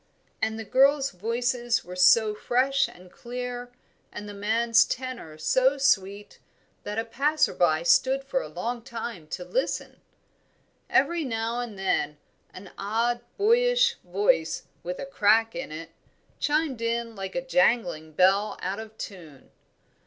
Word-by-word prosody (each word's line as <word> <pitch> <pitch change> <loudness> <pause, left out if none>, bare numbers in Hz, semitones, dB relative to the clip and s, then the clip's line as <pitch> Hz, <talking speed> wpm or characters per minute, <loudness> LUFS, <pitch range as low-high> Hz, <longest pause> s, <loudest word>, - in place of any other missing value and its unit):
And 220 0 0
the 225 - -5
girls' 275 +4 +3
voices 240 +4 -1
were 180 +1 -8
so 210 +4 +5
fresh 270 +5 +1
and 180 0 -15
clear, 245 0 -6 0.4
and 210 - -8
the 205 - -7
man's 225 +3 +3
tenor 250 -12 -6
so 260 - +2
sweet, 200 -6 0 0.4
that 205 +1 -5
a 225 - -1
passer 285 +7 +1
by 165 -2 +2
stood 265 +9 +3
for - - -1
a - - -7
long 240 0 -4
time 230 -8 -7
to 180 +3 -6
listen. - - -3 0.9
Every 340 -1 +2
now 230 -2 -2
and 235 -4 -5
then 170 -6 0 0.3
an 185 0 -11
odd 230 +4 0 0.2
boyish 485 +3 +3
voice, 180 -3 +1 0.2
with 180 +1 -5
a - - -5
crack 225 -3 +3
in 260 -10 -6
it, 165 +2 -8 0.5
chimed 295 -5 0
in 230 0 -2
like 195 -1 -6
a 260 0 -2
jangling 180 -12 +1
bell 195 +5 +3
out 190 +3 -2
of 220 0 -10
tune. 160 -9 -10
230 Hz, 145 wpm, -26 LUFS, 195-260 Hz, 0.9 s, so